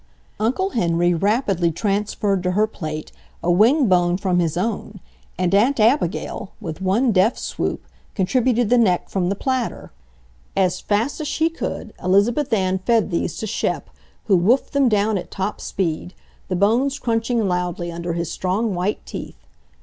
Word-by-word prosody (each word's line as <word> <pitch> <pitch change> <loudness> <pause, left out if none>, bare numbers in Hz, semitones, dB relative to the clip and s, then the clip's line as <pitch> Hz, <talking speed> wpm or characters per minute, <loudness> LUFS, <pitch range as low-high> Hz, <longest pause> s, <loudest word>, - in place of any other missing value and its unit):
Uncle 260 - 0
Henry 175 - +2
rapidly 195 -2 +1
transferred 200 +1 -1
to 180 0 -1
her 210 +3 +3
plate 155 -7 -6 0.3
a 175 - +2
wing 240 - +4
bone 175 -1 +3
from 185 -2 +1
his 170 -1 0
own, 205 0 -3 0.4
and 180 0 0
Aunt 235 +7 +3
Abigail, 215 - +1
with 160 +2 -6
one 215 +7 +2
deft 205 +4 +3
swoop, - - -3 0.3
contributed 240 +3 +1
the 245 - +5
neck 185 -6 +2
from 180 -2 0
the 200 - 0
platter. 260 +2 -2 0.7
As 185 -2 +2
fast 225 +9 -1
as 300 - -3
she 320 +2 +1
could, 330 - -5
Elizabeth 215 +10 +2
Ann 190 -3 +1
fed 225 +1 +1
these 170 -1 -1
to - - -3
Shep, 215 - -2 0.3
who 200 - +4
woofed 235 +10 +2
them 280 -3 +3
down 210 -1 +2
at - - -9
top 195 +2 -3
speed, 180 -1 -3 0.3
the 185 - -1
bones 235 +9 +2
crunching 230 -3 0
loudly 180 -1 -2
under 170 0 -4
his 170 -1 -3
strong, 195 +4 -1
white 185 +4 -2
teeth. - - -7
200 Hz, 160 wpm, -21 LUFS, 180-230 Hz, 0.7 s, the